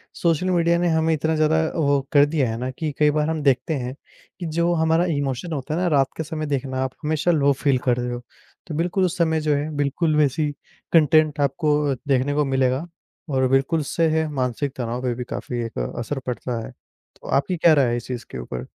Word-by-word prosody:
Social 170 +2 +1
media 170 -1 +3
ने 175 - +1
हमें 160 0 +2
इतना 160 +1 0
ज़्यादा 155 +1 +3
अ, - - -4
वो 140 -3 +2
कर 145 -1 +6
दिया 145 -5 0
है 115 - -3
ना 125 +2 -3
कि 155 +2 -3
कई 150 -1 +5
बार 150 +1 0
हम 160 -2 -2
देखते 140 +3 +2
हैं 125 0 -4 0.4
कि 175 - -4
जो 170 +2 0
हमारा 160 +1 +2
इमोशन 145 0 -2
होता 145 +2 -3
है - - -1
ना, 180 - +1
रात 140 -4 +3
के 160 - -2
समय 155 -1 -4
देखना 135 -2 -2
आप, 130 - -2
हमेशा 155 +3 +1
लो 140 -3 +3
फ़ील 135 -1 +1
कर 125 0 +3
रहे 125 0 -2
हो। 120 - -5 0.5
तो 155 - -5
बिल्कुल, 180 +3 +1
उस 180 0 -2
समय 160 -2 +1
जो 150 -1 +1
है, 145 +2 -2
बिल्कुल 150 +3 +1
वैसी 150 0 +2 0.4
कंटेंट 155 -1 +4
आपको 145 0 +1
देखने 135 +1 +2
को 150 0 +1
मिलेगा 130 +3 +1 0.4
और 130 -1 +2
बिल्कुल 135 +4 +2
उससे 165 +3 0
है, 160 0 +1
मानसिक 130 +1 -2
तनाव 120 0 -3
पे 125 -2 -1
भी 125 - -4
काफ़ी 120 -1 -4
एक 115 - -6 0.2
असर 135 +4 -3
पड़ता 125 -1 -3
है। - - -9
तो - - -21
आपकी 155 +6 0
क्या 160 0 +5
राय 140 -4 +4
है 120 - 0
इस 120 - -7
चीज़ 125 -2 -5
के - - -6
ऊपर? 60 +1 -6
145 Hz, 225 wpm, -23 LUFS, 130-160 Hz, 0.5 s, कर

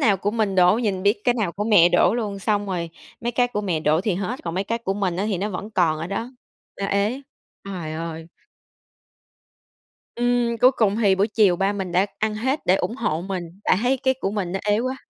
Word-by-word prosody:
nào 205 -3 +4
của 200 +2 -1
mình 215 -3 0
đổ, 180 +2 +5
nhìn 200 -6 -1
biết 205 +2 +2
cái 245 - +3
nào 210 -8 -1
của 205 +3 -3
mẹ 200 -6 +6
đổ 175 +5 +3
luôn. 210 -4 -3
Xong 205 +1 0
rồi 175 -3 -3 0.3
mấy 240 +1 -2
cái 245 +1 +2
của 210 -4 -3
mẹ 180 -6 -1
đổ 155 +1 +2
thì 200 -1 0
hết, 200 +7 -3
còn 165 -1 -3
mấy 190 +2 -1
cái 230 +3 -2
của 195 -4 -2
mình 190 -4 -1
á 190 - -1
thì 195 - -1
nó 200 +3 -2
vẫn 205 +3 -6
còn 165 -6 +1
ở 165 - -4
đó. 225 +6 -4 0.5
Nó 200 - 0
ế, 205 +7 0 0.4
trời 180 -6 -5
ơi. 165 0 -6 1.9
Ừm, 240 -1 +1
cuối 255 - +7
cùng 210 -2 +2
thì 205 -4 +3
buổi 200 +3 +1
chiều 205 -5 +3
ba 195 +2 +1
mình 190 -3 -4
đã 185 +3 +3
ăn 215 0 0
hết 260 +7 -1
để 180 - +5
ủng 225 - -3
hộ 165 - -1
mình 190 -2 -4 0.2
tại - - +3
thấy 255 +2 +2
cái 260 0 +2
của 195 - -1
mình 195 -4 -3
nó 195 - -1
ế 205 0 +2
quá. 255 +3 -2
200 Hz, 240 wpm, -23 LUFS, 180-225 Hz, 1.9 s, cuối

